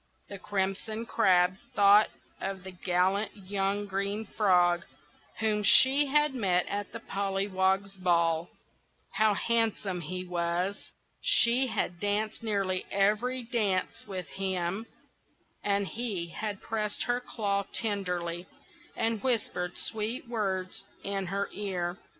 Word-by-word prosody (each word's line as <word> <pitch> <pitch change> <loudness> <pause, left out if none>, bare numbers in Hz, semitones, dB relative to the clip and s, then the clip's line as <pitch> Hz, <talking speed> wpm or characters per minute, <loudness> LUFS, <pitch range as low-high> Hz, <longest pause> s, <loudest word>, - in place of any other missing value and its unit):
The 200 - -7
Crimson 205 +4 -2
Crab 185 -3 +3 0.2
thought 205 +1 +6 0.3
of 190 -1 -4
the 190 - -7
gallant 185 +4 0
young 200 +1 -1
Green 200 +2 -2
Frog, 180 -4 +3 0.5
whom 215 -1 +1
she 265 +7 +6
had 295 0 +3
met 185 -8 +1
at 205 -1 -4
the - - -6
Pollywogs' 195 0 0
Ball. 170 -2 +2 0.6
How 215 +1 +3
handsome 220 -5 0
he 180 +3 -4
was! 175 +2 -2 0.3
She 245 +3 +5
had 180 -6 -2
danced 210 +2 -1
nearly 195 -4 -1
every 215 +6 +1
dance 215 -6 -1
with 185 -4 -5
him, 190 +2 -2 0.8
and 200 0 +1
he 205 -8 -3
had 205 +3 -5
pressed 215 -2 -2
her 245 0 0
claw 200 -5 -2
tenderly, 180 -5 -2 0.5
and 225 -2 0
whispered 205 -8 0
sweet 225 +4 -2
words 195 -5 -2 0.2
in 195 -1 -2
her 200 +2 -1
ear. 180 -3 -3
200 Hz, 120 wpm, -29 LUFS, 185-215 Hz, 0.8 s, thought